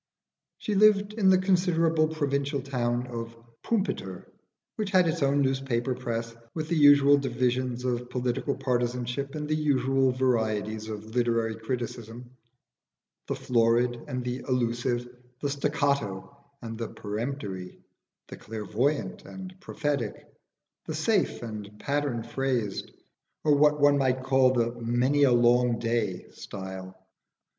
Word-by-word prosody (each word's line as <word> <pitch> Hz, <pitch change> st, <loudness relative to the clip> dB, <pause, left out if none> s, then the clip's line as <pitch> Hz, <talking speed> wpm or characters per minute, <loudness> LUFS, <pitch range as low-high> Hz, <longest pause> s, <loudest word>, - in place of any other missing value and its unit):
She 215 Hz, -, -3 dB
lived 205 Hz, 0 st, +4 dB
in 210 Hz, -3 st, +3 dB
the 190 Hz, -, +6 dB
considerable 170 Hz, -4 st, +2 dB
provincial 140 Hz, -2 st, -1 dB
town 125 Hz, -2 st, -1 dB
of 115 Hz, -2 st, -6 dB, 0.3 s
Pumpiter, 215 Hz, -4 st, -2 dB, 0.5 s
which 215 Hz, -5 st, -2 dB
had 185 Hz, -3 st, +4 dB
its 165 Hz, 0 st, -1 dB
own 140 Hz, +1 st, +3 dB
newspaper 130 Hz, -2 st, 0 dB
press, 115 Hz, -2 st, -4 dB, 0.2 s
with 155 Hz, -1 st, -3 dB
the 170 Hz, -, +1 dB
usual 145 Hz, -1 st, +7 dB
divisions 125 Hz, -1 st, -1 dB
of 125 Hz, -1 st, -2 dB
political 125 Hz, +2 st, -1 dB
partisanship 125 Hz, +1 st, -2 dB
and 150 Hz, -1 st, -4 dB
the 155 Hz, -, 0 dB
usual 135 Hz, -3 st, +2 dB
varieties 110 Hz, -4 st, 0 dB
of 110 Hz, +1 st, -7 dB
literary 115 Hz, -2 st, +1 dB
criticism 120 Hz, 0 st, -5 dB, 1.0 s
the -, -, -1 dB
florid 120 Hz, -1 st, +1 dB
and 125 Hz, -1 st, -4 dB
allusive, 125 Hz, -1 st, -1 dB, 0.3 s
the 145 Hz, -, -2 dB
staccato 140 Hz, -6 st, -1 dB, 0.3 s
and 115 Hz, -1 st, -6 dB, 0.2 s
peremptory, 105 Hz, -4 st, -5 dB, 0.5 s
the -, -, -8 dB
clairvoyant 115 Hz, +7 st, -2 dB
and 190 Hz, -1 st, -8 dB
prophetic, 145 Hz, -, -2 dB, 0.7 s
the 155 Hz, -, -3 dB
safe 185 Hz, -, +1 dB
and 105 Hz, -2 st, -7 dB
pattern 140 Hz, -5 st, -1 dB
phrased, 120 Hz, -4 st, -2 dB, 0.5 s
or 150 Hz, -, +4 dB
what 150 Hz, +1 st, +4 dB
one 145 Hz, 0 st, +5 dB
might 130 Hz, -1 st, +1 dB
call 130 Hz, -1 st, +4 dB
"the 120 Hz, -2 st, +1 dB
many 125 Hz, +5 st, +2 dB
a 140 Hz, -3 st, +6 dB
long 120 Hz, 0 st, +4 dB
day 115 Hz, -6 st, -1 dB
style." 95 Hz, -1 st, -8 dB
125 Hz, 125 wpm, -27 LUFS, 115-145 Hz, 1.0 s, usual